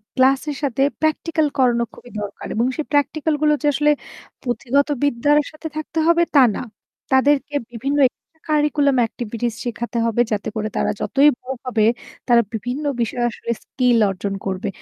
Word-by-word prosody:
Class 265 Hz, +1 st, +4 dB
এর 290 Hz, -, -3 dB
সাথে 270 Hz, -1 st, 0 dB, 0.2 s
practical 315 Hz, 0 st, +1 dB
করানো 240 Hz, -2 st, +3 dB
খুবই 245 Hz, -, -14 dB
দরকার। 205 Hz, -, -7 dB
এবং 230 Hz, +2 st, +2 dB
সেই 310 Hz, -, -3 dB
প্র্যাকটিক্যাল 300 Hz, +2 st, +1 dB
গুলো 300 Hz, 0 st, +4 dB
যে 295 Hz, -, +1 dB
আসলে 295 Hz, +1 st, +3 dB, 0.5 s
পুথিগত 260 Hz, +3 st, +1 dB, 0.2 s
বিদ্যার 285 Hz, +2 st, +3 dB
সাথে 310 Hz, +1 st, -7 dB
থাকতে 310 Hz, +1 st, -3 dB
হবে 340 Hz, 0 st, +5 dB
তা 275 Hz, -, +8 dB
না। -, -, -3 dB, 0.5 s
তাদেরকে 285 Hz, +2 st, +3 dB, 0.2 s
বিভিন্ন 275 Hz, +5 st, -2 dB
এক্সট্রা 320 Hz, +5 st, -20 dB
কারিকুলাম 295 Hz, -2 st, +2 dB
অ্যাক্টিভিটিস 230 Hz, 0 st, -2 dB
শেখাতে 235 Hz, 0 st, -4 dB
হবে 230 Hz, +1 st, +2 dB
যাতে 210 Hz, +1 st, -1 dB
করে 215 Hz, 0 st, -1 dB
তারা -, -, +1 dB
যতই 285 Hz, +2 st, +4 dB
বড় 265 Hz, +1 st, -5 dB
হবে 225 Hz, -4 st, +2 dB, 0.4 s
তারা 240 Hz, -1 st, +6 dB
বিভিন্ন 245 Hz, +7 st, -3 dB, 0.2 s
বিষয়ে 240 Hz, +2 st, -1 dB
আসলে 235 Hz, -, -9 dB
স্কিল 250 Hz, -2 st, +1 dB
অর্জন 195 Hz, +1 st, -3 dB
করবে। 190 Hz, -1 st, -2 dB
265 Hz, 160 wpm, -21 LUFS, 235-295 Hz, 0.5 s, তা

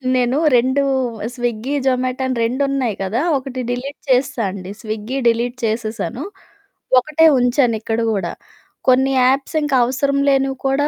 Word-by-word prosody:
నేను 250 Hz, +2 st, +1 dB, 0.2 s
రెండూ 260 Hz, +3 st, +2 dB, 0.5 s
స్విగ్గీ, 240 Hz, +2 st, -2 dB
జొమాటో 255 Hz, 0 st, 0 dB
అని 255 Hz, -, -1 dB
రెండున్నాయి 260 Hz, -1 st, 0 dB
కదా! 220 Hz, +8 st, -1 dB, 0.2 s
ఒకటి 260 Hz, -1 st, -5 dB
డిలీట్ 265 Hz, +4 st, -4 dB
చేసేశా 255 Hz, -1 st, +1 dB
అండి. 190 Hz, 0 st, -8 dB
స్విగ్గీ 220 Hz, +3 st, -4 dB
డిలీట్ 235 Hz, +2 st, +1 dB
చేసేశాను. 225 Hz, +3 st, -3 dB, 0.8 s
ఒకటే 305 Hz, +5 st, +2 dB
ఉంచానిక్కడ 240 Hz, -3 st, +1 dB
గూడా. 195 Hz, -5 st, -2 dB, 0.6 s
కొన్ని 260 Hz, +1 st, +4 dB
యాప్సింక 275 Hz, +3 st, +1 dB
అవసరం 275 Hz, +3 st, 0 dB
లేనివి 270 Hz, -1 st, +1 dB
కూడా 280 Hz, +2 st, +1 dB
255 Hz, 120 wpm, -19 LUFS, 230-270 Hz, 0.8 s, కొన్ని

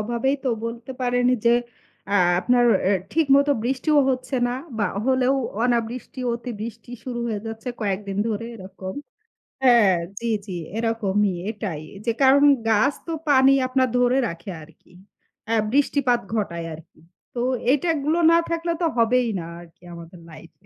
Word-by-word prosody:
অভাবেই 240 Hz, +5 st, 0 dB
তো -, -, +1 dB, 0.2 s
বলতে 230 Hz, +2 st, -6 dB
পারেন 245 Hz, 0 st, +1 dB, 0.2 s
যে 235 Hz, 0 st, +5 dB, 0.5 s
অ্যা 200 Hz, -, +2 dB, 0.2 s
আপনার 245 Hz, +3 st, +3 dB, 0.2 s
এ -, -, +3 dB, 0.2 s
ঠিক 325 Hz, -1 st, +2 dB
মতো 280 Hz, +1 st, +3 dB
বৃষ্টিও 270 Hz, +5 st, +1 dB
হচ্ছে 255 Hz, +1 st, -2 dB
না 245 Hz, -, -2 dB, 0.2 s
বা 205 Hz, -, +2 dB, 0.2 s
হলেও 260 Hz, 0 st, +2 dB, 0.3 s
অনাবৃষ্টি 240 Hz, +1 st, -2 dB
অতি 235 Hz, +1 st, -5 dB
বৃষ্টি 225 Hz, +1 st, -8 dB
শুরু 245 Hz, -2 st, -4 dB
হয়ে 215 Hz, -3 st, -3 dB
যাচ্ছে 225 Hz, +2 st, -6 dB
কয়েকদিন 200 Hz, -1 st, -3 dB
ধরে 220 Hz, 0 st, -3 dB
এরকম। 190 Hz, -2 st, -8 dB, 0.7 s
হ্যাঁ, 235 Hz, -7 st, +5 dB, 0.2 s
জি, 235 Hz, -, -3 dB, 0.2 s
জি, 185 Hz, -4 st, -5 dB, 0.2 s
এরকমই 210 Hz, -3 st, 0 dB, 0.2 s
এটাই। 205 Hz, -8 st, -5 dB, 0.2 s
যে 235 Hz, -, +2 dB
কারণ 275 Hz, +1 st, +6 dB, 0.3 s
গাছ 225 Hz, +6 st, +3 dB
তো 330 Hz, -, -3 dB, 0.2 s
পানি 270 Hz, -1 st, +6 dB
আপনার 255 Hz, 0 st, +1 dB
ধরে 245 Hz, +1 st, +3 dB
রাখে 170 Hz, +2 st, -8 dB
আরকি। 165 Hz, +2 st, -18 dB, 0.6 s
অ্যা 230 Hz, -, +1 dB, 0.2 s
বৃষ্টিপাত 270 Hz, -2 st, +2 dB
ঘটায় 170 Hz, -6 st, -2 dB
আরকি। 160 Hz, +1 st, -15 dB, 0.3 s
তো 240 Hz, -, -2 dB, 0.3 s
এইটাগুলো 305 Hz, +2 st, +1 dB
না 335 Hz, -, +6 dB
থাকলে 335 Hz, 0 st, -1 dB
তো -, -, +2 dB
হবেই 235 Hz, +1 st, +3 dB
না, 165 Hz, -, -6 dB, 0.2 s
আরকি 170 Hz, 0 st, -18 dB
আমাদের 170 Hz, +1 st, -11 dB
লাইফ 160 Hz, +1 st, -13 dB
235 Hz, 150 wpm, -23 LUFS, 205-260 Hz, 0.7 s, কারণ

